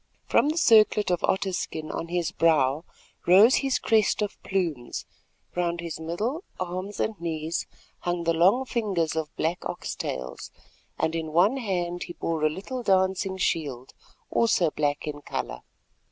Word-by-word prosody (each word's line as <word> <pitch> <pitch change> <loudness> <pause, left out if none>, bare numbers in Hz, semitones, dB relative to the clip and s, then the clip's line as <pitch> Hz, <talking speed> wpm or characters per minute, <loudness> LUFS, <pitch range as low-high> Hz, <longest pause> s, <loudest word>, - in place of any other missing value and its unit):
From 290 - +3
the 310 - -1
circlet 215 - +5
of 175 - 0
otter 190 0 +1
skin 155 -3 -4
on 165 - -4
his 175 0 -1
brow 155 -3 +2 0.4
rose 200 +8 +7
his 270 -2 +1
crest 215 -1 +2
of 205 - -5
plumes, 165 -11 -2 0.5
round 175 -1 0
his 170 -2 -5
middle, 210 - -3 0.2
arms 185 +3 -4
and 215 -5 -2
knees 160 0 -2 0.3
hung 175 -1 -2
the 165 0 +2
long 190 +11 +4
fringes 200 -11 -1
of 160 -2 -2
black 165 +3 -1
oxtails, 65 0 -5 0.5
and 160 - 0
in 160 -1 -3
one 195 +10 +4
hand 175 -7 -2
he 175 - -8
bore 165 -2 -2
a 155 - +5
little 200 +11 -5
dancing 190 -2 +1
shield, 140 -8 -2 0.4
also 185 -8 +3
black 145 -1 -1
in 145 -1 -5
colour. - - -4
175 Hz, 155 wpm, -26 LUFS, 160-200 Hz, 0.5 s, rose